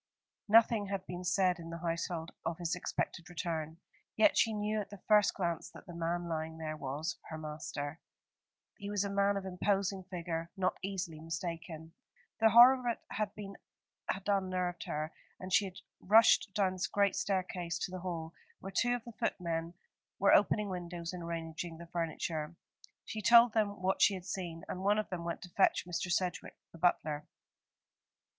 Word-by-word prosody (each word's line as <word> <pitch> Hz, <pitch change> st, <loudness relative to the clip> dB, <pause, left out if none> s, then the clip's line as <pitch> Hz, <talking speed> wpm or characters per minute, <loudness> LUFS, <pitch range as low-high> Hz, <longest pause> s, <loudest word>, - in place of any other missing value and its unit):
Nothing 220 Hz, -1 st, +5 dB
had 195 Hz, -1 st, -3 dB
been 180 Hz, 0 st, -6 dB
said 180 Hz, 0 st, +2 dB
in 165 Hz, 0 st, -8 dB
the 165 Hz, -, -5 dB
household 170 Hz, 0 st, -3 dB
of 165 Hz, -, -2 dB
his 170 Hz, -2 st, -2 dB
expected 180 Hz, -1 st, -3 dB
return: 160 Hz, -2 st, -3 dB, 0.4 s
yet 310 Hz, -2 st, +5 dB
she 225 Hz, -, +4 dB
knew 210 Hz, 0 st, -1 dB
at 200 Hz, -, -8 dB
the 205 Hz, -, -9 dB
first 210 Hz, -1 st, +5 dB
glance 170 Hz, -3 st, -2 dB
that -, -, -13 dB
the 175 Hz, -, -9 dB
man 170 Hz, +1 st, -2 dB
lying 160 Hz, -1 st, -3 dB
there 155 Hz, -1 st, -4 dB
was 145 Hz, +2 st, -3 dB
her 160 Hz, -, -5 dB
master. 150 Hz, 0 st, -5 dB, 0.8 s
He 200 Hz, -, -5 dB
was 205 Hz, -1 st, 0 dB
a 200 Hz, -, -3 dB
man 200 Hz, 0 st, +2 dB
of 195 Hz, -, -4 dB
imposing 195 Hz, +1 st, 0 dB
figure, 170 Hz, -2 st, -4 dB
not 185 Hz, -1 st, +1 dB
easily 185 Hz, -5 st, -4 dB
mistaken. 165 Hz, 0 st, -5 dB, 0.5 s
The 225 Hz, 0 st, +6 dB
horror 245 Hz, +4 st, +9 dB
of 250 Hz, -, -9 dB
it 235 Hz, -, 0 dB, 1.1 s
had 190 Hz, +1 st, -2 dB
unnerved 185 Hz, -3 st, 0 dB
her, 155 Hz, +1 st, -3 dB, 0.3 s
and 185 Hz, 0 st, -6 dB
she 205 Hz, -, +5 dB
had 185 Hz, -1 st, -8 dB, 0.2 s
rushed 220 Hz, +1 st, +5 dB
down 195 Hz, -3 st, +2 dB
the 190 Hz, +1 st, 0 dB
great 200 Hz, -1 st, +3 dB
staircase 180 Hz, -3 st, -1 dB
to 180 Hz, -, -3 dB
the 185 Hz, -, -5 dB
hall, 170 Hz, -3 st, -4 dB, 0.3 s
where 195 Hz, -, -7 dB
two 245 Hz, +4 st, +3 dB
of 240 Hz, -, -6 dB
the 235 Hz, -, -9 dB
footmen 170 Hz, -5 st, -2 dB, 0.4 s
were 200 Hz, -, +5 dB
opening 210 Hz, 0 st, +4 dB
windows 175 Hz, -1 st, -5 dB
and 180 Hz, -, -6 dB
arranging 165 Hz, 0 st, -5 dB
the 170 Hz, -, -9 dB
furniture. 165 Hz, -1 st, -3 dB, 0.5 s
She 215 Hz, -, -5 dB
told 235 Hz, +2 st, +7 dB
them 205 Hz, -3 st, 0 dB
what 190 Hz, +1 st, +1 dB
she 200 Hz, -, +6 dB
had 180 Hz, -1 st, -8 dB
seen, 175 Hz, -4 st, -5 dB
and 185 Hz, -, -5 dB
one 205 Hz, +2 st, +3 dB
of 215 Hz, -, -1 dB
them 180 Hz, -2 st, -4 dB
went 170 Hz, +2 st, -4 dB
to 180 Hz, -, -9 dB
fetch 190 Hz, 0 st, +3 dB
Mr. 175 Hz, 0 st, -3 dB
Sedgewick, 180 Hz, 0 st, -1 dB
the 165 Hz, -, -14 dB
butler. 155 Hz, -3 st, +1 dB
180 Hz, 180 wpm, -33 LUFS, 165-200 Hz, 1.1 s, horror